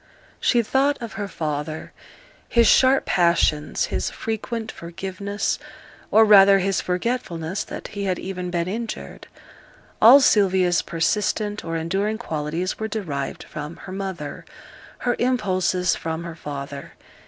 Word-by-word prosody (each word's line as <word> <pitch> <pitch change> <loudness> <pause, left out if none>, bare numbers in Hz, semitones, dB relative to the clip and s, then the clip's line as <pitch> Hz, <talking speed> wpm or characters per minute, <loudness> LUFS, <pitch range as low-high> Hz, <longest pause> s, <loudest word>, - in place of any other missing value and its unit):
She 240 -2 +3
thought 275 +5 +1
of 230 -2 -7
her 205 -2 -4
father 155 -3 -4 0.6
his 235 -1 +4
sharp 265 +4 +5
passions, 170 -4 +2
his - - -1
frequent 225 0 -4
forgiveness, 190 +4 -4 0.5
or 220 +1 +6
rather 200 -2 +8
his 195 0 0
forgetfulness 180 -3 -2
that - - -7
he 200 -1 -4
had 185 -2 0
even 180 -1 -5
been 170 -1 -1
injured. 225 +4 -6 0.7
All 245 +6 +10
Sylvia's 190 -8 +3
persistent 205 +4 -1
or 165 0 -3
enduring 195 +7 -1
qualities 165 -2 -3
were 220 - -2
derived 165 -11 -4
from 150 +2 -7
her 185 - -8
mother, 190 -6 -5 0.6
her 245 -1 +2
impulses 185 -7 +1
from 160 0 -4
her 170 -1 -7
father. 140 -2 -7
190 Hz, 130 wpm, -23 LUFS, 165-215 Hz, 0.7 s, All